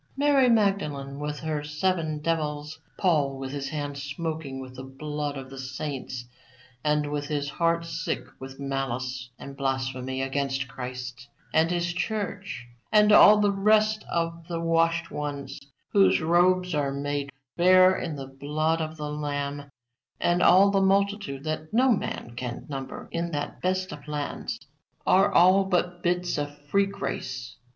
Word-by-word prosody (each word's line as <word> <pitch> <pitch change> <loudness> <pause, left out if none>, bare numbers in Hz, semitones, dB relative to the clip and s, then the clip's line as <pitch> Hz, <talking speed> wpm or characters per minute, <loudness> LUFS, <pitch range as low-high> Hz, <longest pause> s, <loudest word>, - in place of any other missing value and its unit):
Mary 280 -3 +4
Magdalene 150 -11 +1
with 150 0 -4
her 155 -2 -2
seven 155 +1 -1
devils, 150 -1 -2 0.2
Paul 150 -7 +2
with 135 0 -5
his 140 -1 -4
hands 145 -2 -4
smoking 145 -1 -4
with 130 -1 -8
the 130 - -7
blood 145 +2 -4
of 135 0 -8
the 135 - -8
saints, 130 -1 -5 0.6
and 150 -1 +1
with 145 -1 -2
his 145 -1 -1
heart 170 0 +1
sick 165 0 -3
with 135 +1 -9
malice 130 -2 -3
and 140 +1 -9
blasphemy 130 -1 -2
against 135 0 -1
Christ 130 0 -7 0.3
and 160 +1 +4
His 175 0 0
Church, 200 - -3 0.3
and 210 0 +6
all 210 0 +9
the 205 -1 +4
rest 215 +2 +3
of 165 0 -2
the 170 -1 -3
washen 165 0 +1
ones 145 -2 -4 0.3
whose 95 -1 +5
robes 180 +2 +3
are 145 -2 0
made 140 0 -2 0.3
fair 185 +1 +6
in 160 - -3
the 135 -1 -6
blood 150 +4 -1
of 160 0 -4
the 150 -1 -4
Lamb, 145 -1 -3 0.5
and 175 +1 +2
all 195 +3 +7
the 195 -1 +3
multitude 195 -7 +1
that 155 0 -4
no 255 +4 +4
man 195 - -2
can 125 -1 -5
number 135 -2 -6
in 170 0 -2
that 145 0 -4
best 185 0 0
of 145 0 -10
lands, 150 -1 -3 0.5
are 195 +2 +5
all 185 +3 +6
but 180 -2 0
bits 180 -2 0
of 145 0 -4
free 200 +4 +3
grace. 130 -10 -5
150 Hz, 155 wpm, -27 LUFS, 135-180 Hz, 0.6 s, all